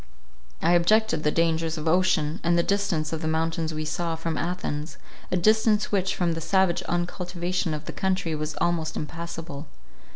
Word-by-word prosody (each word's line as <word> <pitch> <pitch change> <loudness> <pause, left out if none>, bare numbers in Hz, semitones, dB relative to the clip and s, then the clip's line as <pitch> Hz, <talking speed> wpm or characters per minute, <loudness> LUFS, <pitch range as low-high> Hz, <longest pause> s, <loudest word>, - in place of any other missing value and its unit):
I 165 - +4
objected 175 +1 +3
the 150 - +2
dangers 165 0 +1
of 155 +1 -4
ocean, 170 -2 +2
and 170 0 +3
the 170 - +3
distance 190 -6 0
of 160 - -3
the 160 - -2
mountains 160 0 0
we 155 0 -3
saw, 165 +1 -2
from 165 0 -3
Athens; 155 -3 -3 0.3
a 185 - +2
distance 215 +2 +3
which, 195 -1 +1
from 175 -2 +1
the 165 - -4
savage 185 +1 +2
uncultivation 175 -1 -1
of 150 +1 -7
the - - -6
country, 190 -3 0
was 155 0 -3
almost 165 -2 0
impassable. 165 -1 -6
170 Hz, 170 wpm, -26 LUFS, 160-180 Hz, 0.3 s, I